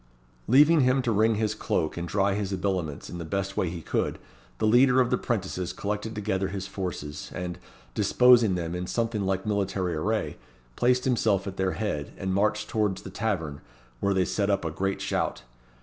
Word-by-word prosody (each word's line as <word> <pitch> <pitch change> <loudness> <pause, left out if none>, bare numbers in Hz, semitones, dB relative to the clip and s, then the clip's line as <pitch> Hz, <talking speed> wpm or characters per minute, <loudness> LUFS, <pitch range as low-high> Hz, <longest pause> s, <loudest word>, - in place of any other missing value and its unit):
Leaving 150 +6 +6
him 130 +1 +3
to 120 - +1
wring 110 +1 +3
his 110 0 0
cloak 80 - -1
and 85 0 -4
dry 100 +3 +1
his 100 -1 -2
habiliments 90 -6 -2
in 90 - -7
the - - -4
best 95 +3 -3
way 90 - 0
he 85 -1 -7
could, - - -1 0.4
the - - 0
leader 125 +3 +5
of 125 -2 +2
the - - +3
'prentices 95 -5 -2
collected 105 +2 -3
together 100 -2 -1
his 95 0 -4
forces, 90 -7 -5
and, 90 -1 -4 0.3
disposing 120 - +5
them 85 -1 -3
in 90 0 -3
something 115 -3 -1
like 95 +1 -1
military 100 -4 -1
array, 75 -1 -1 0.4
placed 125 +1 +2
himself 110 -6 +2
at 95 -1 -6
their 95 -1 0
head, 75 -10 -3
and 95 -1 -2
marched 105 +2 +1
towards 105 -3 -1
the 95 - -8
tavern, 80 -9 -2 0.4
where 100 +6 +1
they 95 -1 +3
set 100 +2 0
up 100 -3 +1
a 80 - -1
great 95 +4 -2
shout. - - -1
100 Hz, 190 wpm, -27 LUFS, 90-110 Hz, 0.4 s, Leaving